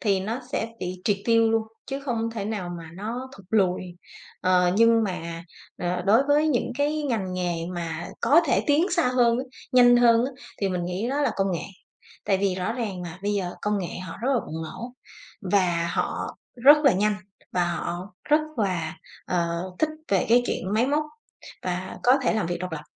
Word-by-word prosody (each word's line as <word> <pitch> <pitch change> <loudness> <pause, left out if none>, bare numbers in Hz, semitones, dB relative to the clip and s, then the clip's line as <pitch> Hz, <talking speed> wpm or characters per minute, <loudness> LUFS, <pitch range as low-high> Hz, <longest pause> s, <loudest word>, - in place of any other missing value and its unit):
thì 200 -4 +2
nó 225 +7 -3
sẽ 225 - -1
bị 180 0 -4
triệt 205 -3 +2
tiêu 230 -1 +4
luôn, 225 0 +2 0.2
chứ 275 +1 -4
không 230 -4 -2
thể 220 -3 -4
nào 205 -4 -3
mà 165 -1 -10
nó 235 +6 -5
thụt 195 -2 -16
lùi. 190 -5 +2 0.6
Ờ, 180 -1 +3
nhưng 230 0 +5
mà, 170 -3 -5 0.3
ờ, 180 0 -1
đối 225 +6 +6
với 300 +2 +4
những 245 -3 0
cái 300 +1 +1
ngành 220 -9 -1
nghề 180 -1 -1 0.2
mà 170 -1 -4
có 315 +4 +6
thể - - +2
tiến 305 +5 +4
xa 340 -7 +2
hơn 240 -2 +3
á, 260 - -2 0.3
nhanh 245 -1 +7
hơn 235 0 +5
á, 270 - -2 0.3
thì 195 - +1
mình 180 -2 -2
nghĩ 185 +7 -2
đó 285 +2 0
là - - +2
công 195 -1 +1
nghệ. 170 - -3 0.6
Tại 195 - +2
vì 195 -1 +1
rõ 185 +4 -2
ràng 210 -7 -4
mà 175 +1 -7
bây 205 +1 0
giờ 190 -3 -1
công 210 0 +1
nghệ 180 -2 -4
họ 165 -3 -7
rất 265 - +1
là 235 - +2
bùng 160 +1 -5
nổ, 240 +10 -7 0.6
và 175 -4 +2
họ - - -2 0.3
rất 290 +2 +10
là 275 - +7
nhanh, 210 +2 +1 0.4
và 180 -1 +2
họ 175 +2 -4
rất 300 +1 +4 0.2
là, 170 -6 -1 0.3
ờ, 170 -1 0 0.2
thích 315 - +2 0.2
về 195 -3 +2
cái 240 +2 +5
chuyện 185 - -2
máy 235 +4 +3
móc 295 +2 +1 0.6
và 180 +1 -3
có 255 +3 +5
thể - - +2
làm 215 -6 0
việc 175 0 -2
độc 180 -1 -5
lập, 150 -1 -4
205 Hz, 205 wpm, -25 LUFS, 180-245 Hz, 0.6 s, rất